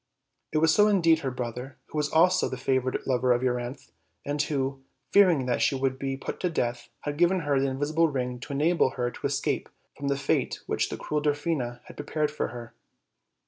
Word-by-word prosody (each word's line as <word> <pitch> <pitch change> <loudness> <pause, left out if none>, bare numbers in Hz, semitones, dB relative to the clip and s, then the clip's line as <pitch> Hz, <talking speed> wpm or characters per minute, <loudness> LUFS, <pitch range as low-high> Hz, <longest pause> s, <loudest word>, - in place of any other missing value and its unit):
It - - 0
was 160 +4 +3
indeed 185 -6 +5
her 135 - -2
brother, 125 +1 -5
who - - -6
was 150 0 0
also 180 +4 +4
the 130 - -4
favored 130 0 0
lover 125 -1 +2
of 120 +1 -1
Euryanthe, 125 +1 -3 0.3
and 145 0 0
who, 135 -2 -2 0.3
fearing 180 -10 +5
that 125 -1 0
she 140 - +3
would 130 0 -1
be 135 -1 -2
put - - -6
to 180 - 0
death, 120 -7 -2
had 145 +1 -4
given 180 +1 +3
her 145 -3 +1
the 135 - +1
invisible 150 +5 +1
ring 125 -4 -3
to 135 - -7
enable 155 +1 +3
her 120 -1 0
to - - -3
escape - - -1 0.3
from 140 - -5
the 140 0 +1
fate 140 - 0
which - - 0
the - - -4
cruel 150 0 -2
Dwarfina 145 -5 -1
had - - -14
prepared 150 0 -1
for 150 - -2
her. 120 -1 -9
140 Hz, 200 wpm, -27 LUFS, 125-155 Hz, 0.3 s, indeed